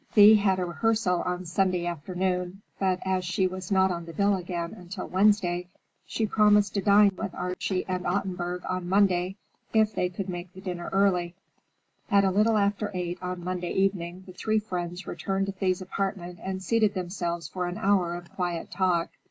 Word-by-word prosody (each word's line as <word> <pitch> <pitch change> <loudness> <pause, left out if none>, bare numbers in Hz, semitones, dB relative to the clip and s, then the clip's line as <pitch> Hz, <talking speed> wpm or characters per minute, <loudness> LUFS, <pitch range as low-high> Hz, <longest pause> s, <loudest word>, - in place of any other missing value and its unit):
Thea 210 0 +9
had 195 -2 +2
a 180 - -1
rehearsal 180 +1 +1
on 180 0 -2
Sunday 180 0 +1
afternoon, 180 +3 -2 0.2
but 185 -2 +1
as 190 -1 0
she 185 +2 0
was 185 +1 -4
not 190 -1 +4
on 170 -1 -4
the 165 - -9
bill 200 +4 +2
again 175 -2 -4
until 180 +1 -7
Wednesday, 185 -3 +2 0.4
she 225 - -1
promised 210 -1 +4
to 200 - 0
dine 205 0 +6
with - - -5
Archie 180 +1 -2
and 185 -1 -2
Ottenburg 180 -2 -2
on 185 -1 -3
Monday, 190 -1 +2 0.4
if 220 -1 +4
they 180 - 0
could 185 +2 -5
make 175 -1 -6
the 190 - -11
dinner 180 -3 -5
early. 185 -3 +2 0.7
At 200 -2 +5
a 190 - +3
little 215 +3 +3
after 205 +1 +1
eight 180 0 -3
on 180 -1 -4
Monday 180 -1 -3
evening, 185 -2 -1
the 185 - -11
three 215 +4 0
friends 180 -3 -4
returned 195 0 -2
to 195 - -3
Thea's 190 -1 -1
apartment 185 -2 -4
and 190 0 -4
seated 215 +1 +2
themselves 175 -3 -3
for 180 +3 -3
an 175 - -4
hour 185 -3 +2
of 175 0 -10
quiet 175 -3 -3
talk. 180 -2 +1
185 Hz, 185 wpm, -27 LUFS, 175-200 Hz, 0.7 s, Thea